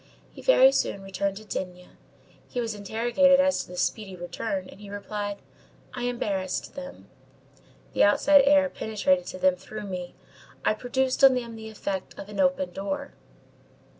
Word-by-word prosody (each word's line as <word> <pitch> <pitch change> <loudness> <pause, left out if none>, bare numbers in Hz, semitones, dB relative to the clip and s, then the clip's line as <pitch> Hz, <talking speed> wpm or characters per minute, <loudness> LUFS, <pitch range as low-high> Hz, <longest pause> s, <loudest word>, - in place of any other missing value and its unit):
He - - -12
very 270 - +6
soon 200 -7 -1
returned 195 0 -2
to 215 - -10
D—— 180 -3 -5 0.6
He 245 - -4
was 230 -2 -2
interrogated 240 +7 +3
as 280 0 +3
to - - -10
this 180 0 -1
speedy 195 -1 -3
return, 185 +2 -4
and 200 - -14
he 205 - -10
replied: 205 0 -4 0.6
_"I 245 -1 -3
embarrassed 200 -6 -2
them. 275 0 -9 0.9
The - - +4
outside 285 +8 +6
air 285 0 +6
penetrated 270 +4 0
to - - -6
them 185 0 +3
through 210 +3 -8
me. 180 -2 -6 0.5
I - - +4
produced 255 +4 -1
on 265 -1 +8
them 235 -2 -4
the 220 0 -8
effect 200 -3 -5
of 200 - -8
an 205 -1 -7
open 185 -1 +2
door." 280 +11 -4
210 Hz, 165 wpm, -26 LUFS, 195-260 Hz, 0.9 s, on